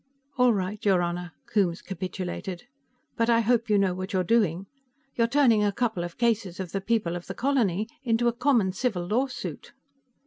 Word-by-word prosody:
"All 250 -2 +5
right, 200 0 -2
your 190 -4 +3
Honor," 175 0 -3
Coombes 185 -5 0
capitulated. 185 0 -5 0.5
"But 230 0 +2
I 230 0 +5
hope 230 0 +1
you 210 - +4
know 195 -2 +2
what 185 +3 -5
you're 185 -1 +2
doing. 195 -3 +1 0.5
You're 230 -1 +2
turning 235 -5 +4
a 205 - +2
couple 220 -4 -1
of 175 -1 -7
cases 220 -7 0
of 185 -3 -5
the 195 - -2
People 200 -5 0
of 175 - -7
the 195 - -6
Colony 220 -7 +1
into 240 -2 +1
a 235 - +2
common 240 -6 +2
civil 195 -4 -1
lawsuit." 250 +7 -3
205 Hz, 180 wpm, -26 LUFS, 185-235 Hz, 0.5 s, All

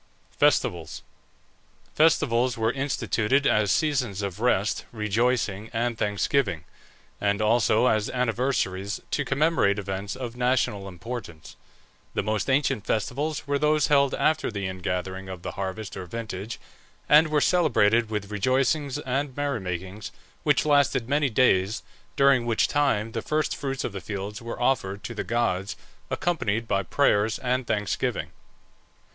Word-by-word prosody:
FESTIVALS. 85 -2 +1 0.9
Festivals 125 -6 +3
were 110 0 +1
instituted 135 -1 0
as 105 -5 +3
seasons 125 -8 0
of 100 0 -4
rest, 110 -4 +1
rejoicing, 110 -1 0
and 120 +1 0
thanksgiving, 105 - 0 0.6
and 100 0 +1
also 110 +1 +3
as 110 -4 +2
anniversaries 115 -5 -1
to 145 - 0
commemorate 140 -8 +2
events 100 +1 -4
of 125 -2 -6
national 125 -5 0
importance. 100 -4 -8 0.6
The - - 0
most 110 +4 -1
ancient 130 -6 +1
festivals 135 +6 -2
were 140 0 0
those 150 0 +2
held 140 -2 +4
after 155 0 +1
the 100 -4 -3
ingathering 95 +1 -4
of 90 -2 -8
the - - -4
harvest 95 +2 -5
or 90 -2 -6
vintage, 110 +1 -6 0.5
and 150 +2 +6
were 150 -1 +2
celebrated 120 -10 +3
with 105 -2 -4
rejoicings 130 +6 +1
and 135 +1 -3
merry 145 -4 -1
makings, 95 +2 -5 0.3
which - - +2
lasted 140 -5 +3
many 145 0 +2
days, 105 -4 +2 0.3
during 135 -4 +4
which 115 -2 +2
time 115 -7 +1
the 115 - -3
first 155 +4 -1
fruits 135 -2 -3
of - - -3
the 95 -1 -6
fields 100 +4 -5
were 115 0 -6
offered 105 -6 0
to 115 - -5
the - - -3
gods, 100 -5 -1 0.3
accompanied 115 -10 -1
by 100 - +1
prayers 105 +1 +2
and 125 -1 -1
thanksgiving. 105 -2 -1
115 Hz, 140 wpm, -26 LUFS, 100-135 Hz, 0.9 s, and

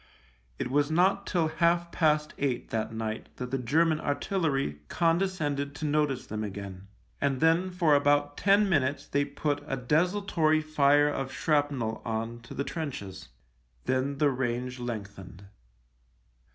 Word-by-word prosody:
It 125 - -3
was 145 +1 +2
not 185 +5 +2
till 170 -3 +1
half 170 +2 +1
past 150 -2 +1
eight 135 -4 -2
that 110 -1 -1
night 110 0 -4
that 125 -1 -6
the 135 - 0
German 155 +6 +2
artillery 145 - -1
condescended 165 -5 0
to 155 - -4
notice 150 -3 0
them 110 0 -4
again, 100 -2 -7 0.3
and 135 -2 +1
then 165 +3 +3
for 175 -4 +2
about 145 0 +3
ten 200 +1 +4
minutes 145 -5 +1
they 140 0 +1
put 145 0 -2
a 135 - -2
desultory 155 +3 +2
fire 145 -1 +3
of 135 -2 -3
shrapnel 145 -6 0
on 115 +1 -3
to 115 - -11
the 140 - -1
trenches. 140 - -6 0.6
Then 130 +2 0
the 145 -1 +3
range 125 0 -2
lengthened. 100 -6 -7
145 Hz, 140 wpm, -28 LUFS, 125-160 Hz, 0.6 s, ten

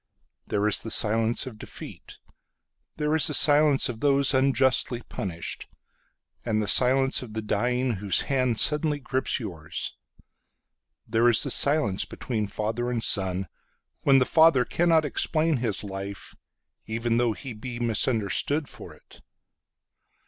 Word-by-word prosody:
There 105 +1 -1
is 105 - +1
the 115 - -5
silence 110 +3 +2
of 115 -5 -10
defeat. - - -11 0.8
There 150 0 -1
is 160 - +3
the 150 - +2
silence 145 0 +5
of 120 -4 -7
those 140 0 +2
unjustly 130 -2 +1
punished; 85 -4 -6 0.8
And 110 -2 -1
the 105 - -2
silence 135 +4 +3
of 115 -4 -10
the 110 - -3
dying 125 +5 -1
whose 100 -1 0
handSuddenly 140 +4 +1
grips 130 0 -1
yours. 85 -7 -6 1.1
There 115 +2 +2
is 115 - +5
the - - -2
silence 140 -10 +2
between 110 -4 -5
father 110 +4 -4
and 120 -2 -2
son, 95 -1 +2 0.5
When 135 -1 +4
the 130 - +3
father 160 -6 +4
cannot 165 -2 +1
explain 155 +2 0
his 115 -5 -2
life, 100 0 -7 0.5
Even 115 +1 -2
though 120 -2 +1
he 130 +3 -9
be 120 +2 -8
misunderstood 120 +5 0
for - - -11
it. - - -19
120 Hz, 135 wpm, -25 LUFS, 110-135 Hz, 1.1 s, silence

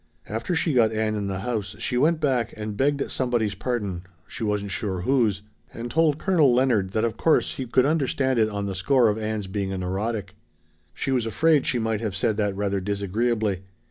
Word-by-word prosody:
After 115 - -2
she 160 0 +1
got 115 -3 +4
Ann 110 0 0
in 105 -2 -2
the 95 -1 -3
house 105 -3 -3
she 115 +3 -2
went 155 +6 +3
back 130 -7 0
and 105 -1 -4
begged 140 +3 0
somebody's 120 -5 0
pardon 100 -4 -3 0.3
she 120 - -6
wasn't 105 -2 -1
sure 95 -3 -2
whose 110 -4 +1 0.3
and 120 +1 -5
told 155 0 +3
Colonel 160 -7 +3
Leonard 120 -7 +2
that 110 - +1
of 115 -1 -1
course 160 - +2
he 130 - -4
could 125 +2 +3
understand 135 -4 +1
it 110 -1 +3
on 100 -1 -3
the 100 - -3
score 120 +6 +3
of 105 +1 -1
Ann's 110 -1 -2
being 95 0 -3
a 95 - -3
neurotic. 95 +2 -3 0.6
She 135 - -2
was 125 -4 +1
afraid 155 +5 +3
she 125 - +1
might 110 -2 -1
have 105 -4 -3
said 100 +2 +1
that 105 -2 0
rather 100 0 -1
disagreeably. 100 +1 -1
110 Hz, 205 wpm, -25 LUFS, 100-130 Hz, 0.6 s, got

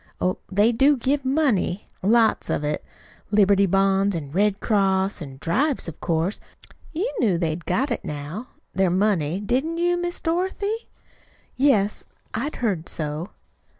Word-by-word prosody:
Oh, 185 0 0
they 205 +4 +4
do 270 +5 +4
give 275 +3 0
money 260 - +1
lots 225 +3 +3
of - - 0
it 150 0 -2 0.5
Liberty 200 -1 +4
Bonds 195 +1 +2
an' 145 -4 -5
Red 200 +4 +2
Cross, 195 -3 +1
an' 135 -3 -8
drives, 270 - 0
of 165 - -8
course. 165 +4 0 0.5
You 375 +10 -2
knew 200 -8 +3
they'd 165 -1 -2
got 255 +9 0
it 235 - -2
now 150 - -6 0.3
their 190 -1 +2
money, 185 -3 +1
didn't 265 +11 -1
you, 350 +1 +2
Miss 350 0 -3
Dorothy?" 380 +6 -2 0.7
"Yes, 220 -7 +2 0.3
I 235 +5 -1
had 300 - -4
heard 195 -9 -1
so." 155 +3 -3
205 Hz, 150 wpm, -24 LUFS, 180-270 Hz, 0.7 s, they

